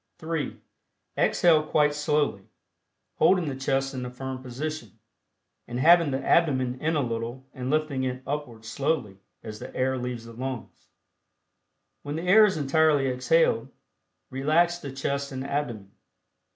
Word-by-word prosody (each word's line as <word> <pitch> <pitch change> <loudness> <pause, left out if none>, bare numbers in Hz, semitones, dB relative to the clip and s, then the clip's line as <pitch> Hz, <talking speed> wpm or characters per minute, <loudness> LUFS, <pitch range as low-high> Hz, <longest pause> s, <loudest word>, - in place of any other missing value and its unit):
(3) 160 -3 -4 0.6
Exhale 165 -3 +4
quite 150 -1 +2
slowly, 150 -7 0 0.8
holding 180 -3 +4
the 140 - -3
chest 135 +1 -1
in 130 -1 -4
a 125 - -4
firm 130 +1 -6
position, 140 +1 -6 0.7
and 120 +1 -4
having 170 +2 +6
the 135 0 -3
abdomen 130 -6 +2
in 160 +1 0
a 145 - +1
little 115 +2 -4
and 125 0 -5
lifting 155 -2 0
it 130 0 -3
upward 130 -6 -5
slowly 115 -4 -2 0.2
as 110 -1 -8
the - - -8
air 130 0 0
leaves 120 -2 -5
the 115 - -11
lungs. 130 +1 -7 1.1
When 145 +1 -5
the 165 - -4
air 205 +4 +7
is 195 -5 0
entirely 145 -1 +3
exhaled, 125 -1 +2 0.6
relax 160 +6 +2
the 140 -5 -7
chest 140 +1 -3
and 130 0 -4
abdomen. 120 -9 -3
135 Hz, 145 wpm, -26 LUFS, 125-155 Hz, 1.1 s, air